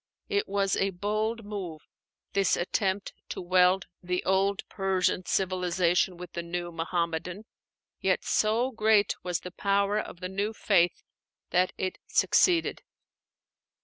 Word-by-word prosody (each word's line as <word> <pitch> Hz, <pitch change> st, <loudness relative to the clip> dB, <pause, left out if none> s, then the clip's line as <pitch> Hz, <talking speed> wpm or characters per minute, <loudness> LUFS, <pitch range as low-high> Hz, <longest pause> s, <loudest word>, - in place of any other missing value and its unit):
It 410 Hz, -1 st, 0 dB
was 195 Hz, -1 st, +1 dB
a 195 Hz, -, +1 dB
bold 215 Hz, +4 st, -2 dB
move, 185 Hz, -7 st, -6 dB, 0.5 s
this 195 Hz, -3 st, +2 dB
attempt 190 Hz, +2 st, -1 dB, 0.2 s
to -, -, -5 dB
weld 180 Hz, +1 st, +3 dB, 0.2 s
the 180 Hz, 0 st, -2 dB
old 195 Hz, +1 st, +1 dB
Persian 190 Hz, -1 st, 0 dB
civilization 180 Hz, -1 st, +1 dB
with 180 Hz, 0 st, -9 dB
the 170 Hz, -, -3 dB
new 175 Hz, 0 st, -4 dB
Muhammadan. 170 Hz, +3 st, -2 dB, 0.5 s
Yet -, -, +1 dB
so 230 Hz, +5 st, +1 dB
great 215 Hz, -3 st, +3 dB
was 180 Hz, -1 st, -2 dB
the 180 Hz, -, -8 dB
power 200 Hz, +2 st, +1 dB
of 170 Hz, -, -7 dB
the 180 Hz, -, -4 dB
new 200 Hz, +3 st, -2 dB
faith 180 Hz, -5 st, +2 dB, 0.5 s
that 180 Hz, +1 st, +3 dB
it 185 Hz, -1 st, -3 dB
succeeded. 345 Hz, -3 st, +3 dB
190 Hz, 130 wpm, -28 LUFS, 180-205 Hz, 0.5 s, weld